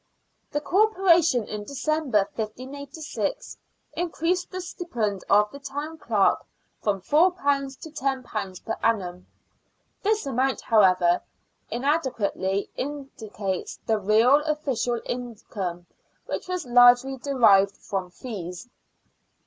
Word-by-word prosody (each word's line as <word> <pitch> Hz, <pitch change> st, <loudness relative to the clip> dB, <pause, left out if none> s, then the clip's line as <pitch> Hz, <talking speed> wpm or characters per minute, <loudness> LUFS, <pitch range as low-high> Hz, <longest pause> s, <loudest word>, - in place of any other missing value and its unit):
The 295 Hz, -, -2 dB
Corporation, 350 Hz, -, +3 dB
in 210 Hz, -1 st, -5 dB
December, 275 Hz, -4 st, 0 dB
1586, 280 Hz, -, -5 dB, 0.4 s
increased 350 Hz, +1 st, -1 dB
the 370 Hz, -, -5 dB
stipend 230 Hz, -, -3 dB
of 210 Hz, +1 st, +4 dB
the 280 Hz, -, -9 dB
Town 290 Hz, +3 st, -6 dB
Clerk 210 Hz, -7 st, +2 dB, 0.4 s
from 200 Hz, -3 st, 0 dB
£4 285 Hz, -, +2 dB
to 320 Hz, -, -8 dB
£10 255 Hz, -, -3 dB
per 225 Hz, -, -2 dB
annum. 185 Hz, -5 st, -1 dB, 0.7 s
This 430 Hz, -2 st, +1 dB
amount, 265 Hz, 0 st, 0 dB
however, 185 Hz, -5 st, +4 dB, 0.5 s
inadequately 235 Hz, -8 st, -1 dB
indicates 220 Hz, -9 st, -5 dB
the 220 Hz, -1 st, +1 dB
real 225 Hz, +8 st, +5 dB
official 270 Hz, -6 st, -1 dB
income, 205 Hz, -7 st, -5 dB, 0.4 s
which -, -, -4 dB
was 365 Hz, -2 st, -3 dB
largely 245 Hz, +2 st, +6 dB
derived 225 Hz, -8 st, +4 dB
from 190 Hz, -2 st, -4 dB
fees. 180 Hz, 0 st, -7 dB
250 Hz, 100 wpm, -25 LUFS, 205-295 Hz, 0.7 s, largely